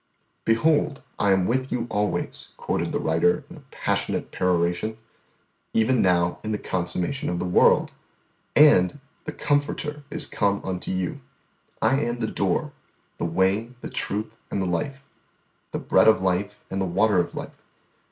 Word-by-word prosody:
"Behold 145 Hz, +5 st, +2 dB, 0.2 s
I 100 Hz, -, +3 dB
am 95 Hz, -1 st, +3 dB
with 130 Hz, +4 st, 0 dB
you 120 Hz, -2 st, -1 dB
always," 105 Hz, 0 st, -2 dB
quoted -, -, -2 dB
the -, -, 0 dB
writer 85 Hz, -, +2 dB
in 175 Hz, -, -10 dB
a 150 Hz, -, -14 dB
passionate -, -, -2 dB
peroration, 90 Hz, +4 st, 0 dB, 0.8 s
"_even 115 Hz, +3 st, +3 dB
now 90 Hz, -2 st, +2 dB
in 110 Hz, -, -3 dB
the 105 Hz, -, 0 dB
consummation 95 Hz, -, -2 dB
of 90 Hz, -, -1 dB
the 85 Hz, -, -2 dB
world; 90 Hz, -, +4 dB, 0.6 s
and, 145 Hz, -6 st, +6 dB, 0.3 s
the 155 Hz, -, -3 dB
Comforter 145 Hz, 0 st, -1 dB
is 150 Hz, -1 st, +3 dB
come 100 Hz, -6 st, 0 dB
unto 90 Hz, -1 st, -3 dB
you. 95 Hz, -1 st, -2 dB, 0.6 s
I 135 Hz, -, +3 dB
am 120 Hz, -1 st, -1 dB
the 115 Hz, -, -1 dB
Door -, -, -1 dB, 0.5 s
the -, -, -1 dB
Way, 95 Hz, +8 st, 0 dB
the -, -, -7 dB
Truth 110 Hz, +2 st, -3 dB
and -, -, -2 dB
the 95 Hz, -, 0 dB
Life 135 Hz, +11 st, -2 dB, 0.7 s
the -, -, -3 dB
Bread -, -, +3 dB
of 110 Hz, -, +6 dB
Life 95 Hz, +2 st, -1 dB
and 95 Hz, 0 st, -1 dB
the -, -, +1 dB
Water 100 Hz, +2 st, +3 dB
of 85 Hz, -, -2 dB
Life. -, -, -8 dB
105 Hz, 160 wpm, -25 LUFS, 90-130 Hz, 0.8 s, and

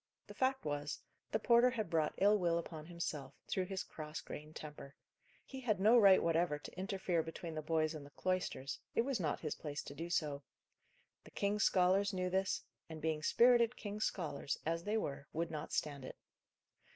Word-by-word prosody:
The -, -, -10 dB
fact 265 Hz, 0 st, 0 dB
was, 145 Hz, 0 st, -2 dB, 0.3 s
the -, -, +2 dB
porter 235 Hz, +2 st, +5 dB
had 220 Hz, -8 st, -3 dB
brought 160 Hz, -2 st, +1 dB
ill 205 Hz, +2 st, +5 dB
will 170 Hz, -2 st, +2 dB
upon 160 Hz, -2 st, -6 dB
himself, 150 Hz, -6 st, -4 dB
through 185 Hz, -, 0 dB
his 190 Hz, 0 st, -3 dB
cross 155 Hz, -2 st, -7 dB
grained 150 Hz, +1 st, -9 dB
temper. 145 Hz, -2 st, -9 dB, 0.5 s
He 265 Hz, -, -7 dB
had 220 Hz, -7 st, 0 dB
no 215 Hz, +5 st, +6 dB
right 200 Hz, -5 st, +7 dB
whatever 165 Hz, -2 st, +2 dB
to 150 Hz, -, -11 dB
interfere 185 Hz, -2 st, 0 dB
between 165 Hz, +1 st, -6 dB
the 155 Hz, -, -3 dB
boys 155 Hz, 0 st, +1 dB
and 155 Hz, -2 st, -7 dB
the 140 Hz, -, -12 dB
cloisters; 180 Hz, -5 st, -2 dB, 0.2 s
it -, -, +5 dB
was 265 Hz, -3 st, -1 dB
not 155 Hz, -5 st, -1 dB
his 155 Hz, -, -2 dB
place 150 Hz, -1 st, -5 dB
to -, -, -8 dB
do 165 Hz, +4 st, -5 dB
so. 150 Hz, -4 st, 0 dB, 0.8 s
The -, -, -13 dB
king's 205 Hz, +1 st, +1 dB
scholars 190 Hz, +2 st, +3 dB
knew 180 Hz, -1 st, -1 dB
this; 190 Hz, +1 st, 0 dB, 0.3 s
and, 160 Hz, -1 st, -7 dB
being 155 Hz, -1 st, -1 dB
spirited 240 Hz, +6 st, +5 dB
king's 210 Hz, 0 st, -2 dB
scholars, 145 Hz, -6 st, -2 dB
as 165 Hz, +1 st, -1 dB
they 210 Hz, +2 st, +1 dB
were, 140 Hz, -7 st, -3 dB
would 165 Hz, +1 st, -1 dB
not 155 Hz, -1 st, -5 dB
stand 140 Hz, -3 st, -2 dB
it. -, -, -8 dB
170 Hz, 190 wpm, -36 LUFS, 155-200 Hz, 0.8 s, right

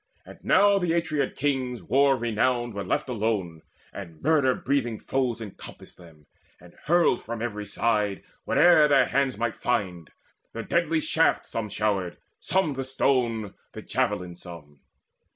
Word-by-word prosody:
And -, -, -13 dB
now 200 Hz, +1 st, +4 dB
the 175 Hz, -3 st, 0 dB
Atreid 155 Hz, -3 st, -2 dB
kings, 130 Hz, -4 st, -1 dB
the -, -, -18 dB
war 135 Hz, +2 st, +3 dB
renowned, 120 Hz, +1 st, 0 dB
Were 100 Hz, 0 st, -4 dB
left -, -, -1 dB
alone, 105 Hz, -9 st, -2 dB, 0.3 s
and 85 Hz, -6 st, -9 dB
murder 145 Hz, -4 st, +2 dB
breathing 125 Hz, -5 st, -1 dB
foes 125 Hz, -3 st, -1 dB
Encompassed 105 Hz, -4 st, -11 dB
them, 80 Hz, -4 st, -17 dB, 0.3 s
and 90 Hz, +1 st, -17 dB
hurled 170 Hz, -5 st, +3 dB
from 115 Hz, +1 st, -6 dB
every 105 Hz, -3 st, -4 dB
side 105 Hz, -1 st, 0 dB, 0.2 s
Whate'er 170 Hz, -4 st, +5 dB
their 140 Hz, -3 st, +4 dB
hands 135 Hz, -2 st, 0 dB
might 120 Hz, 0 st, -2 dB
find 95 Hz, -, -2 dB, 0.4 s
the 115 Hz, -, -5 dB
deadly 165 Hz, +3 st, 0 dB
shaft 165 Hz, +1 st, +1 dB
Some 110 Hz, -2 st, -4 dB
showered, 100 Hz, -3 st, -1 dB, 0.2 s
some 185 Hz, -6 st, 0 dB
the 135 Hz, 0 st, -4 dB
stone, 120 Hz, -5 st, 0 dB, 0.2 s
the -, -, -8 dB
javelin 90 Hz, -1 st, -2 dB
some. 85 Hz, -5 st, -12 dB
120 Hz, 150 wpm, -26 LUFS, 100-140 Hz, 0.4 s, Whate'er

